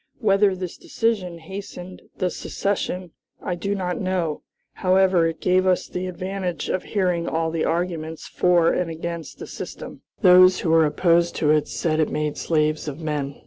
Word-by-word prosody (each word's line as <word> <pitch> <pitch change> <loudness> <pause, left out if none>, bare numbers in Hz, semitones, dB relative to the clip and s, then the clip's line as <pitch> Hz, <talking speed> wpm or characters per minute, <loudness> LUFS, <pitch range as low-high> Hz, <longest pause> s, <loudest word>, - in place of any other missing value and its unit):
Whether 200 -3 +3
this 180 -2 -6
decision 205 -7 -1
hastened 185 +1 -9 0.2
the 180 -1 0
secession 185 -3 -3 0.3
I 180 - -3
do 200 +4 -2
not 180 -2 -2
know; 180 -5 -1 0.3
however, 185 -2 +3
it 165 - -4
gave 185 +1 +2
us 185 -1 +2
the 180 +1 -4
advantage 185 -2 -4
of 185 - 0
hearing 180 -4 -1
all 160 0 -1
the 165 -1 -1
arguments 165 -2 -2
for 175 -2 +3
and 180 -2 -1
against 165 0 -6
the - - -7
system. - - -8 0.2
Those 185 -1 +7
who 165 - 0
were 160 -1 +5
opposed 170 +2 +2
to 150 -2 +2
it 150 -4 +2
said 155 +7 -1
it 155 - +2
made 150 -1 -2
slaves 155 -1 0
of 150 +1 -5
men. 145 -3 -3
175 Hz, 170 wpm, -23 LUFS, 160-185 Hz, 0.3 s, Those